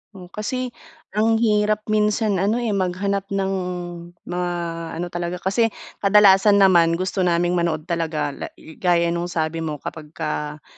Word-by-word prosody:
Oh, 180 -2 -11
kasi 250 +4 -3 0.4
ang 220 +2 +2
hirap 215 -1 +2
minsan 210 -1 +2
ano, 205 +4 +2
eh, 230 - 0
maghanap 195 +1 -1
ng 195 -1 -1 0.7
mga 180 0 -2 0.4
ano 175 +2 -3
talaga 175 0 -3
kasi 195 +6 +1 0.3
kadalasan 200 0 +6
naman 170 -3 +5
gusto 185 +3 -2
naming 175 +1 +2
manood 160 -2 -1
talaga 160 -3 -2
la - - -6
gaya 170 +1 0
no'ng 170 0 -2
sabi 165 -1 -2
mo 160 -2 -3
kapagka, 150 -1 -5
180 Hz, 140 wpm, -22 LUFS, 170-205 Hz, 0.7 s, kadalasan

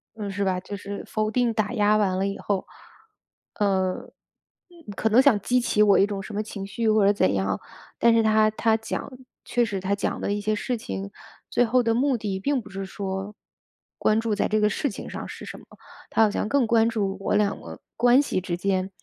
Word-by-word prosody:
嗯， 205 -2 -5
是 200 +1 -2
吧。 185 -2 0
就 195 +2 -7
是 200 0 -6
否 215 0 -1
定 240 0 +1
打 215 +1 -1
压 210 -2 +3
完 190 -3 +1
了 190 - 0
以 200 - -4
后， 200 -2 -2 0.9
呃， 190 -3 0 0.9
可 220 - 0
能 230 +4 +6
想 265 -7 +4
激 250 +5 +2
起 210 -3 +2
我 205 -2 +5
一 195 - +4
种 200 -2 -4
什 215 - -9
么 205 - -1
情 205 -2 -6
绪 225 +3 -1
或 215 -2 +4
者 200 - +5
怎 100 - +2
样， 95 0 -1 0.4
但 235 - +5
是 230 0 +4
他 215 0 +4
他 220 +1 +1
讲 220 +5 -5 0.3
确 245 - +1
实 205 -4 -2
他 190 +2 -1
讲 200 - -2
的 200 - -1
一 205 - -2
些 215 +1 0
事 250 +4 -2
情， 100 - -6 0.4
最 245 - +3
后 245 +2 +2
的 230 -1 +2
目 260 +2 +2
的 200 -3 -3
并 275 +6 0
不 - - -14
是 195 0 -5
说， 195 +1 -5 0.6
关 215 +1 +3
注 225 -1 -1
在 205 - 0
这 215 - +1
个 210 - +3
事 285 - -1
情 205 - -8
上 - - -6
是 - - -9
什 - - -8
么， - - -17 0.4
他 225 - +3
好 215 - +3
像 210 - -2
更 280 -1 +3
关 225 0 +4
注 200 -4 -1
我 195 - -1
2 205 -1 +1
个 - - -10 0.2
关 245 +2 +5
系 235 -9 -2
之 175 -1 -3
间， 190 +1 -1
210 Hz, 240 characters per minute, -25 LUFS, 195-225 Hz, 0.9 s, 能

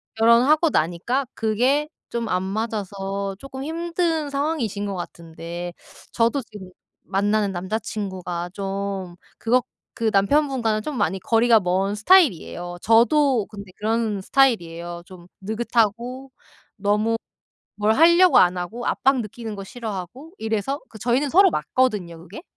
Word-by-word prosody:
결혼하고 250 +9 +4
나니까 190 - 0
그게 250 +7 +1 0.2
좀 235 -1 -3
안 180 0 +1
맞아서 200 -2 -3
쪼끔 270 0 -8
힘든 330 -1 -1
상황이신 275 -8 -2
것 195 - -3
같은데 170 0 -7 0.4
저도 235 +4 +1
지금 210 -5 -11 0.3
만나는 205 +1 0
남자친구가 185 -2 -4
좀 195 -2 -4 0.2
그것 245 +2 +2 0.3
그 225 -1 0
남편분과는 230 0 +2
좀 285 +2 -5
많이 195 -2 0
거리가 225 +2 +4
먼 190 +2 0
스타일이에요. 205 - +3
저도 240 +1 +4
근데 200 -3 -11
그런 220 -2 -1
스타일이에요. 175 -9 +1
좀 180 -2 -14
느긋하고 235 +4 -1 0.5
너무 210 +3 +1 0.6
뭘 210 +1 +2
하려고 340 +4 +6
안 180 0 +4
하고 215 +7 -5
압박 265 -1 +2
느끼는 220 0 -6
거 195 - -7
싫어하고 230 - -7
이래서 220 +6 -2
그 220 - -12
저희는 245 +6 +1
서로 385 +2 +6
맞거든요 205 - -1
그게. 185 - -11
220 Hz, 295 characters per minute, -23 LUFS, 195-255 Hz, 0.6 s, 하려고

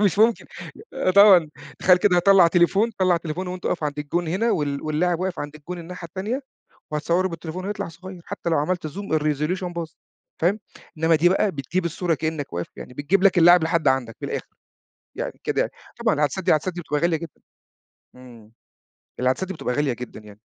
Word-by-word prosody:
مش 200 -2 +2
ممكن، 225 +2 +3 0.7
طبعًا، 190 -6 +8 0.3
تخيّل 180 -1 +5
كده 180 -1 +3
هاطلّع 185 0 +6
تليفون 180 +6 +3
هاطلّع 185 -2 +4
تليفون 170 +2 -4
وأنت 180 0 -5
واقف 165 - -1
عند 150 0 -3
الجون 160 +4 -2
هنا 205 +8 +1
وال 145 -2 -1
واللاعب 165 +3 0
واقف 185 -1 -2
عند 145 0 -6
الجون 175 +4 -8
الناحية 170 +1 -8
التانية، 210 - -3 0.5
وهاتصوَّره 170 +5 +1
بالتليفون 165 +2 -6
ويطلع 205 -3 -3
صغيّر، 185 +1 -11
حتى 170 - -4
لو 160 - +2
عملت 170 +3 -1
زوم 160 +1 -2
الresolution 150 +5 -1
باظ، 170 -2 -4 0.5
فاهم؟ 195 +6 +2 0.4
إنّما 160 +1 +4
دي 165 +3 +4
بقى، 195 +3 +2
بتجيب 155 +6 -2
الصورة 170 +1 -1
كأنك 155 -2 -4
واقف، 85 0 -4
يعني 125 - -10
بتجيب 180 +8 +1
لك 195 -2 +5
اللاعب 175 0 +7
لحد 165 -3 +1
عندك 130 -4 0
من - - -3
الآخر، - - -4 0.7
يعني - - -5
كده - - 0
يعني، - - -1 0.3
طبعًا - - +2
العدسات 150 +6 -1
العدسات 170 +2 +2
دي 175 - -5
بتبقى 150 -2 -2
غالية 170 -1 +2
جدًا. 165 -1 -10 0.8
إمم، 120 -4 -15 0.7
العدسات 130 +9 0
دي 190 - -4
بتبقى 125 - -3
غالية 145 -1 +1
جدًا 120 -1 -8
يعني. 105 -1 -15
170 Hz, 185 wpm, -23 LUFS, 150-185 Hz, 0.8 s, طبعًا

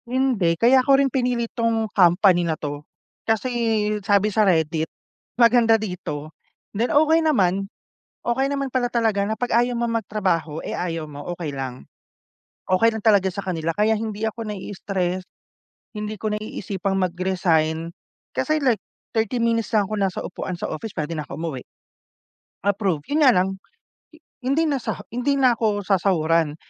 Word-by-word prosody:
Hindi 240 -10 +1
kaya 255 +5 +5
ko 270 +1 +4
rin 275 -2 +1
pinili 245 -2 0
tong 230 -1 0
company 180 0 +5
na 165 -2 -1
to, 145 -1 -5 0.4
kasi 225 +3 0 0.5
sabi 205 +1 +2
sa 220 - +3
Reddit, 160 -4 +2 0.5
maganda 235 -1 +5
dito, 160 -7 -5 0.4
then 225 +4 0
okey 315 +2 +4
naman. 195 - +1 0.5
Okey 260 +3 +1
naman 275 -1 -2
pala 250 -1 +1
talaga 220 -4 +1
na 220 - -1
pag 245 +2 -3
ayaw 245 0 +1
mo 235 0 -1
mag-trabaho, 190 -8 -1
eh, - - -5
ayaw 165 -2 -3
mo 145 -1 -9
okey 165 -4 -4
lang. 130 -2 -6 0.9
Okey 185 +5 +4
lang 220 - -5
talaga 205 -4 +4
sa 200 +2 -5
kanila 165 -3 -1
kaya 215 +1 +3
hindi 215 -1 -4
ako 220 0 -5
na 210 - -4
i-stress, 185 -2 -3 0.7
hindi 210 0 -4
ko 215 -1 -1
naiisipang 200 -2 -3
mag-resign, 170 -3 0 0.4
kasi 310 0 +1
like 235 -6 +2 0.4
30 220 +2 +1
minutes 230 -1 0
lang 210 - +4
ako 215 - -3
nasa 190 -2 0
upuan 185 - -5
sa - - -3
office 205 +7 -5
pwede 155 -1 -3
na 150 - -3
ako 135 - -7
umuwi. 155 -7 -4 1.0
Approve, 195 -6 +1
yun 305 +2 +2
nga - - +9
lang, 185 +1 +1 0.9
hindi 275 +6 +2
na 280 -2 0
sa 220 -2 -3
hindi 250 +4 0
na 255 -2 +5
ako 210 -2 +1
sasahuran, 165 -5 +2
205 Hz, 160 wpm, -23 LUFS, 175-235 Hz, 1.0 s, nga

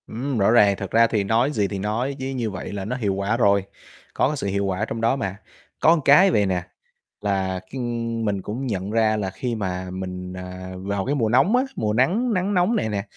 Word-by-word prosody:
Ừm, 125 +3 -3
rõ 100 +1 +3
ràng. 105 -4 +5
Thật 95 -1 -6
ra 115 +1 +5
thì 110 -3 0
nói 115 +7 +2
gì 105 -8 0
thì 100 0 -5
nói 115 +7 -2
chứ, 130 - -3
như 125 -4 -2
vậy 95 -3 -6
là 100 -1 -4
nó 125 +5 -2
hiệu 105 -6 -1
quả 100 +4 -1
rồi, 100 -4 +3 0.5
có - - +2
cái 150 +1 -2
sự 100 - -3
hiệu 100 0 0
quả 95 +2 -1
trong 115 0 -5
đó 115 +3 +3
mà. 100 -8 -3 0.4
Có 165 0 +4
cái 185 +7 +7
vầy 105 - +3
nè, 90 -2 -1 0.6
là 95 -2 -1
khi - - -6 0.5
mình 100 -3 -1
cũng 120 +8 -4
nhận 100 -3 -3
ra 110 -1 +2
là 100 -2 -2
khi 120 +5 -4
mà 95 -3 -3
mình, 90 -1 -6
à, 90 0 -8
vào 100 +1 -3
cái 140 - 0
mùa 115 -6 +1
nóng 135 - +4
á, 255 - +3
mùa 105 0 -1
nắng 200 - +2
nắng 190 +1 0
nóng 185 +5 +2
này 110 - 0
nè, 100 -2 -2
105 Hz, 235 wpm, -23 LUFS, 95-130 Hz, 0.6 s, cái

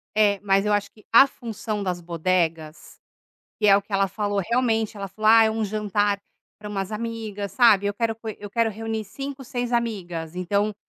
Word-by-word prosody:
É, 205 -2 +3
mas 195 0 +2
eu 210 - +1
acho 205 -1 0
que 215 - -21
a 235 +4 +9
função 225 -5 -5
das 180 -2 -2
bodegas, 165 -2 -2 0.6
que 210 - +2
é 195 - +8
o - - -2
que 200 +1 -12
ela 195 0 +3
falou, 205 +1 -2
realmente 225 -3 0
ela 195 - -5
falou: 215 +3 0
"Ah, 225 0 +8
é 220 - +1
um 220 0 -2
jantar 205 -1 0 0.4
para 210 - -8
umas 195 -1 -3
amigas 215 -3 -4
sabe, 205 -4 +5
eu 205 - 0
quero 225 +2 -1
f 220 -2 -6
eu 205 0 -8
quero 230 +1 +1
reunir 220 0 -4
5, 275 +5 -7
6 245 -1 -3
amigas.", 180 -8 -2
então, 200 +3 0
210 Hz, 200 wpm, -24 LUFS, 195-225 Hz, 0.6 s, a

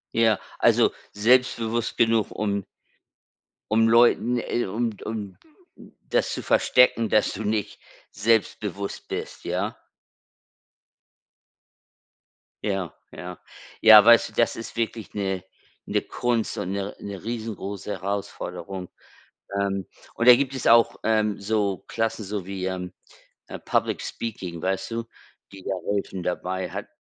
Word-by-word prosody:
Ja, 115 -2 +4 0.2
also - - +4 0.2
selbstbewusst 115 0 +2
genug 115 -2 +2
um 100 -2 -2 1.1
um 115 +1 +4
Leuten, 120 +1 +4
äh 120 +1 -1
um 115 +5 -1
d - - -13
um 105 -3 -5 0.7
das - - +1
zu - - -4
verstecken, 120 -3 +4
dass 105 - +2
du 110 - -5
nicht 105 -1 -2 0.3
selbstbewusst 100 -2 -1
bist, - - -5
ja? - - -2 2.9
Ja, 95 -6 -2 0.2
ja. 90 +3 -8 0.4
Ja, 110 -1 +10
weißt 115 +1 +6
du, - - -19
das 115 - +2
ist 115 - -8
wirklich 115 -1 -3
'ne 95 -2 -2 0.4
'ne - - 0
Kunst 120 -2 -1
und 90 - -3
'ne 100 0 -3
'ne 100 -1 -7
riesengroße 110 -4 -5
Herausforderung. 95 -1 -5 0.7
Ähm, 100 -1 -1 0.3
und 115 - +2
da 125 - +12
gibt 135 0 -1
es 130 - -4
auch, 115 0 +5
ähm, 110 -2 +1
so 100 -2 0
Klassen, 115 -1 -2
so 100 -2 -4
wie, 95 -1 -4
ähm 90 -1 -4 0.6
äh, - - -7
Public - - -1
Speaking, 90 -7 -5
weißt 95 +2 -1
du, 115 0 -2 0.5
die 95 -1 -12
da 95 - -1 0.2
helfen 95 -2 -3
dabei 90 +1 -3
hat - - -5
105 Hz, 130 wpm, -25 LUFS, 95-115 Hz, 2.9 s, da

